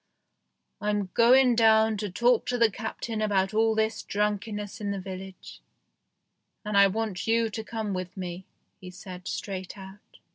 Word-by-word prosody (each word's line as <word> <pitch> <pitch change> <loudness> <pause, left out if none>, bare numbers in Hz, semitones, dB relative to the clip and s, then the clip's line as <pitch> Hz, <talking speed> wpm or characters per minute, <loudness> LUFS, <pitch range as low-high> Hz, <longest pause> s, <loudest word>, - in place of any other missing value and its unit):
"I'm 205 -2 -1
going 250 +2 +6
down 220 -1 +4
to 205 0 -3
talk 235 +5 +2
to 245 - 0
the 230 -2 +4
Captain 220 +1 -5
about 195 -2 +1
all 220 0 +2
this 220 0 0
drunkenness 210 +1 -3
in 205 - -2
the 200 -1 -2
village, 190 0 -9 1.0
and 210 -1 -3
I 200 0 +7
want 210 -1 -3
you 225 0 +2
to 220 +2 -5
come 220 -2 -4
with 185 0 -5
me," 180 0 -6 0.3
he 185 - -10
said 180 0 -10
straight 190 -1 -5
out. 190 +1 -13
210 Hz, 155 wpm, -27 LUFS, 190-225 Hz, 1.0 s, I